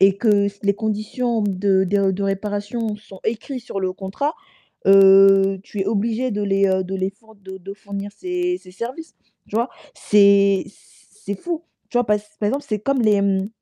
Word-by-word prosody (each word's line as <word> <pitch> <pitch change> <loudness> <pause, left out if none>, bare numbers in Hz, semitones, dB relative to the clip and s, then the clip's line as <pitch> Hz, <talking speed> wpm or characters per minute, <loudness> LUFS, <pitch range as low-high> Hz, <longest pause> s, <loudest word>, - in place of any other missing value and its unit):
et 195 0 +5
que 225 - 0 0.4
les 200 - +4
s - - 0
conditions 220 +2 -2
de 195 -1 +1
de 195 +1 +2
de 195 +2 -3
réparation 205 +3 -3
sont 200 -2 -15
écrits 235 +4 -3
sur 225 -4 -6
le 185 -1 -1
contrat, 195 - -3 0.5
heu, 195 0 +6
tu 210 -2 -7
es 190 - -1
obligé 225 +4 0
de 205 0 -2
les, 195 -1 +2
heu, 190 0 +1
de 190 +1 -5
les 190 0 -1
four 220 +2 -22
de 190 -1 -10
de 190 +2 -8
fournir 200 0 -7
ces 360 -1 -2
ces 180 - -15
services, 245 - -7 0.3
tu - - -4
vois? 235 +3 0 0.2
C'est 200 -1 +4
c - - -18 0.4
c'est 200 0 -6
fou. 340 -2 -4 0.3
Tu 245 - +1
vois, 245 - +2
pass 210 0 -1
par 205 - +1
exemple, 275 +6 -2
c'est 215 -2 -2
comme 275 +3 0
les, 210 -2 +3
mmh, 195 0 0
205 Hz, 200 wpm, -21 LUFS, 195-225 Hz, 0.5 s, heu